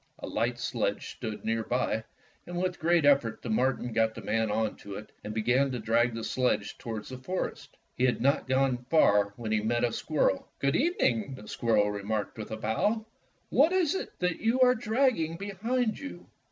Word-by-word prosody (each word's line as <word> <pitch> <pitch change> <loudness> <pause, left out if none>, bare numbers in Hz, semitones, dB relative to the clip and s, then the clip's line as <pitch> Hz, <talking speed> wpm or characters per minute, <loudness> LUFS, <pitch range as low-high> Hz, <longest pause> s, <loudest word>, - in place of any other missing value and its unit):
A - - -7
light - - -1
sledge - - -2
stood 110 -1 -6
near 115 0 0
by, 115 -2 0 0.4
and 175 0 -5
with 185 0 -1
great 170 -1 +3
effort 135 -6 +3
the 115 - -3
marten 125 0 0
got 110 0 +2
the - - -8
man 110 0 0
onto 105 -2 -2
it 105 - -9
and 105 - -5
began 125 +6 +2
to 130 - -3
drag 115 +1 +2
the 115 - -4
sledge 125 -5 0
toward 110 -2 -5
the 130 -1 -8
forest. 180 +9 -4 0.2
He 125 - +2
had 125 - +1
not 140 +3 +2
gone 130 -1 +2
far 100 -10 +4
when 115 -2 -5
he 110 -1 +2
met 120 +2 0
a 120 - +2
squirrel. 150 -11 0
"Good 140 0 +1
evening," 140 - +1
the 105 -5 -12
squirrel 105 -2 +2
remarked 105 +1 -3
with 110 - -6
a 110 - -4
bow, 205 - 0 0.4
"what 305 +8 +4
is 365 -3 +2 0.2
that 180 -2 -1
you 230 +4 +1
are 250 0 +7
dragging 220 - +1
behind 215 +5 -1
you. 280 - -8
125 Hz, 190 wpm, -29 LUFS, 110-175 Hz, 0.4 s, are